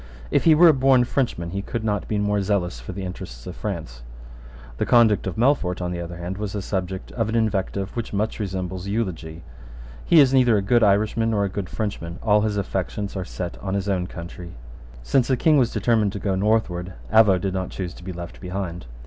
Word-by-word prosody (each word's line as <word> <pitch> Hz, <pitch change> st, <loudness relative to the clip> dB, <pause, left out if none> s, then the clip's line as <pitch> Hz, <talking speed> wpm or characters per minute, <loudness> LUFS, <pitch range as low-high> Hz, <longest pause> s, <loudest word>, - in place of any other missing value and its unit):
"If -, -, +2 dB
he 160 Hz, -2 st, +7 dB
were 170 Hz, +3 st, +7 dB
a 160 Hz, -, +7 dB
born 130 Hz, -2 st, +4 dB
Frenchman 120 Hz, -10 st, -1 dB
he 100 Hz, -, -2 dB
could 115 Hz, +3 st, -4 dB
not 105 Hz, -3 st, -1 dB
be 105 Hz, -, -1 dB
more 105 Hz, 0 st, +1 dB
zealous 95 Hz, -9 st, -1 dB
for -, -, -8 dB
the 100 Hz, -, -6 dB
interests -, -, -8 dB
of -, -, -7 dB
France." -, -, -5 dB, 0.8 s
The -, -, 0 dB
conduct 115 Hz, -5 st, +4 dB
of 95 Hz, -, -3 dB
Melfort, 110 Hz, -8 st, +2 dB
on 90 Hz, -1 st, -3 dB
the 85 Hz, -1 st, -4 dB
other 85 Hz, 0 st, -7 dB
hand, 90 Hz, +3 st, -5 dB
was 105 Hz, -2 st, -3 dB
the 105 Hz, -, -3 dB
subject 95 Hz, -1 st, -4 dB
of 115 Hz, -2 st, -1 dB
an 110 Hz, -, -2 dB
invective 100 Hz, -3 st, -1 dB
which 115 Hz, -1 st, -4 dB
much 105 Hz, +3 st, -2 dB
resembles 95 Hz, -2 st, -4 dB
eulogy: 85 Hz, -7 st, -3 dB, 0.6 s
"He 170 Hz, -, +5 dB
is 135 Hz, -2 st, +6 dB
neither 125 Hz, -4 st, +5 dB
a -, -, +1 dB
good 120 Hz, +4 st, +3 dB
Irishman 110 Hz, +2 st, +2 dB
nor 105 Hz, -2 st, +1 dB
a -, -, -2 dB
good 95 Hz, -1 st, -5 dB
Frenchman. 90 Hz, -5 st, -4 dB
All 105 Hz, -1 st, +4 dB
his 105 Hz, -1 st, -1 dB
affections 100 Hz, +1 st, -3 dB
are 95 Hz, -, -2 dB
set 90 Hz, -1 st, -6 dB
on 95 Hz, 0 st, -3 dB
his 100 Hz, 0 st, -2 dB
own 90 Hz, -3 st, 0 dB
country." 85 Hz, +1 st, -9 dB, 0.5 s
Since 125 Hz, -, +2 dB
the 130 Hz, -, +2 dB
King 155 Hz, +2 st, +4 dB
was 120 Hz, -3 st, +2 dB
determined 110 Hz, -4 st, +1 dB
to 100 Hz, -, -4 dB
go 100 Hz, 0 st, -1 dB
northward, 95 Hz, -3 st, 0 dB, 0.2 s
Avaux 105 Hz, -4 st, +6 dB
did 95 Hz, +1 st, -2 dB
not 95 Hz, -1 st, -2 dB
choose 90 Hz, -2 st, -5 dB
to -, -, -13 dB
be 95 Hz, -, -5 dB
left 85 Hz, 0 st, -8 dB
behind. 90 Hz, -6 st, -5 dB
100 Hz, 220 wpm, -23 LUFS, 90-110 Hz, 0.8 s, he